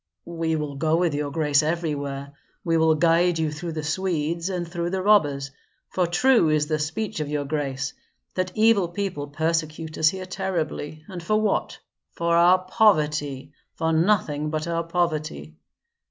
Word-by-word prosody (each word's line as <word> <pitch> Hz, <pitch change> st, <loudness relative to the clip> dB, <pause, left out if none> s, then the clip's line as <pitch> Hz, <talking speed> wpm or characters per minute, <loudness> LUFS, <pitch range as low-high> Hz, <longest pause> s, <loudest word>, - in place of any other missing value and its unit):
"We 165 Hz, -1 st, -2 dB
will 150 Hz, -2 st, -3 dB
go 160 Hz, +2 st, +2 dB
with 170 Hz, -2 st, +1 dB
your 145 Hz, 0 st, -2 dB
grace 150 Hz, -1 st, +2 dB
everywhere; 145 Hz, -4 st, -3 dB, 0.3 s
we 165 Hz, -1 st, +1 dB
will 160 Hz, -1 st, +4 dB
guide 170 Hz, +2 st, +3 dB
you 160 Hz, -2 st, 0 dB
through 165 Hz, +2 st, -5 dB
the 155 Hz, -1 st, -4 dB
Swedes 170 Hz, 0 st, -1 dB
and 180 Hz, -2 st, -3 dB
through 170 Hz, 0 st, -3 dB
the 190 Hz, 0 st, -2 dB
robbers, 145 Hz, -10 st, +3 dB, 0.4 s
for 180 Hz, -2 st, +1 dB
true 235 Hz, 0 st, +4 dB
is 155 Hz, -1 st, +2 dB
the 155 Hz, 0 st, -1 dB
speech 180 Hz, +7 st, -3 dB
of 150 Hz, -1 st, -3 dB
your 145 Hz, -1 st, -2 dB
grace, 140 Hz, -2 st, -2 dB, 0.4 s
that 185 Hz, 0 st, -2 dB
evil 215 Hz, -4 st, +4 dB
people 175 Hz, -5 st, -4 dB
persecute 160 Hz, +1 st, -2 dB
us 155 Hz, -, +5 dB
here 185 Hz, +1 st, -5 dB
terribly, 165 Hz, -5 st, -3 dB
and 185 Hz, -3 st, -7 dB
for 215 Hz, +6 st, +1 dB
what? 215 Hz, -2 st, 0 dB, 0.4 s
For 170 Hz, 0 st, 0 dB
our 175 Hz, +2 st, +6 dB
poverty, 150 Hz, -8 st, +1 dB, 0.2 s
for 160 Hz, 0 st, 0 dB
nothing 160 Hz, -4 st, +1 dB
but 155 Hz, 0 st, -2 dB
our 170 Hz, 0 st, -1 dB
poverty. 155 Hz, -, -2 dB
160 Hz, 165 wpm, -24 LUFS, 150-175 Hz, 0.4 s, our